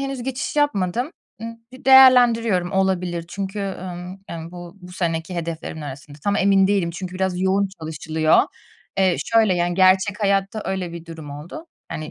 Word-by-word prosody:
henüz 270 -2 -4
geçiş 265 +3 -4
yapmadım. 245 - 0 0.3
Imm, 230 0 -6 0.2
d 255 - -14
değerlendiriyorum. 240 -8 +6
Olabilir 180 -3 0
çünkü, 195 +2 -5
ımm, 185 -1 -6
ımm, 165 0 -7
bu 175 +1 -10
bu 180 0 -12
seneki 165 0 -2
hedeflerimin 165 -1 -5
arasında. 145 +1 -9
Tam 205 0 +1
emin 195 0 +4
değilim 195 -4 +1
çünkü 180 +1 -7
biraz 185 -1 -1
yoğun 195 +1 +2
çalışılıyor. 155 0 +2 0.6
Eee, 185 -2 +3
şöyle, 220 -5 +3
yani, 175 0 0
gerçek 190 +3 +3
hayatta 200 +1 +1
öyle 185 -3 -3
bir 170 -1 -8
durum 160 -3 -9
oldu. 165 - -9 0.2
Hani, 155 0 -6
185 Hz, 160 wpm, -22 LUFS, 170-205 Hz, 0.6 s, değerlendiriyorum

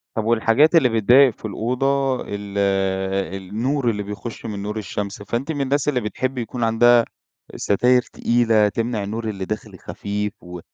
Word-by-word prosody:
طب 110 - -1
والحاجات 115 +8 +3
اللي 145 -7 +5
بتضايق 120 +4 +5
في - - -10
الأوضة، 130 +5 0
ال 100 0 -6 0.8
النور 120 +7 -1
اللي 105 -2 -2
بيخش 105 +4 -7
من 105 -3 -5
نور 105 +1 -4
الشمس. 100 0 -5
فأنتِ 120 +9 -3
من 145 -3 -3
الناس 140 +1 0
اللي 130 -4 +1
بتحبي 130 +4 -3
يكون 120 +1 -4
عندها 115 +1 +4 0.5
ستاير 125 +5 +3
تقيلة، 115 -3 +2
تمنع 115 -1 -2
النور 110 +2 -4
اللي 95 -2 -4
داخل 105 -2 -6
خفيف 105 +4 -4
و 90 0 -8
115 Hz, 155 wpm, -21 LUFS, 105-125 Hz, 0.8 s, اللي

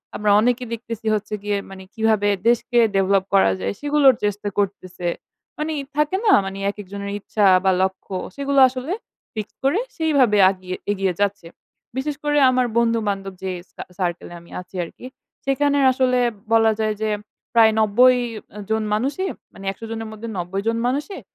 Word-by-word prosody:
আমরা 210 -1 +1
অনেকে 245 +3 +1
দেখতেছি 230 -1 -6
হচ্ছে 210 0 -3
গিয়ে 205 -1 0
মানে 190 0 -10
কিভাবে 220 -2 +2 0.2
দেশকে 240 +1 +2 0.2
ডেভেলপ 195 0 +3
করা 195 - +5
যায়? - - -2
সেগুলোর 290 -3 +4
চেষ্টা 205 0 -1
করতেছে। 185 -3 -2 0.5
মানে 315 +1 -2 0.2
থাকে 300 +5 +2
না? 410 - +6
মানে 195 0 -5
একেকজনের 200 0 -7
ইচ্ছা 205 +1 0 0.2
বা 190 - +4
লক্ষ্য 190 0 -2 0.2
সেগুলো 280 0 +1
আসলে 260 +7 -4 0.4
fix 215 -2 -3 0.2
করে 275 +9 +2 0.2
সেইভাবে 280 -10 +3
আগিয়ে 185 -1 -5 0.2
এগিয়ে 195 -2 0
যাচ্ছে। 200 -4 -1 0.5
বিশেষ 285 +2 -2
করে 295 0 +1
আমার 255 -1 +2
বন্ধু-বান্ধব 210 -4 0
যে 190 - -2 0.2
সার - - -8
সার্কেলে 175 -1 -3
আমি 170 - -18
আছি 180 - -17
আরকি। 170 - -11 0.4
সেখানে 285 +1 +2
আসলে 255 -1 +2 0.3
বলা 225 -1 +5
যায় 215 -1 0
যে 220 - 0 0.4
প্রায় 225 -2 +6
৯০ 245 +4 +5 0.5
জন 220 0 +1
মানুষই 280 - -1 0.2
মানে 195 - -11
১০০ 225 - -10
জনের 225 0 -4
মধ্যে 220 +1 -8
৯০ 180 +3 -3
জন 230 0 +1
মানুষই 295 +9 -2
220 Hz, 155 wpm, -22 LUFS, 195-255 Hz, 0.5 s, না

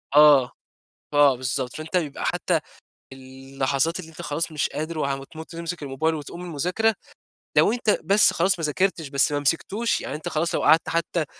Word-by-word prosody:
آه. 145 -4 +7 0.6
آه، 145 -3 +5
بالضبط. 130 0 -3
فأنت 160 +4 -4
بيبقى 150 -5 -2
حتى - - 0 0.5
اللحظات 135 +4 -2
اللي 160 - -11
أنت 155 - -10
خلاص 160 +3 -2
مش 150 - 0
قادر 155 +1 -5
وهم 135 -1 -2
تموت 160 +3 -11
وتمسِك 170 -1 -5
الموبايل 145 +4 -1
وتقوم 155 +3 -7
من 180 - -7
المذاكرة، 180 +8 0 0.6
لو - - +5
أنت 225 -4 +1
بس 200 +3 +4
خلاص 185 +1 +2
ما 165 - -1
ذاكرتش 165 0 0
بس 140 +2 +1
ما 145 - 0
مسِكتوش، 195 - 0
يعني 140 - -5
أنت 150 - -5
خلاص 160 +2 -1
لو - - -1
قعَدْت 160 +1 +4
حتى 170 -1 -1
155 Hz, 180 wpm, -24 LUFS, 140-170 Hz, 0.6 s, آه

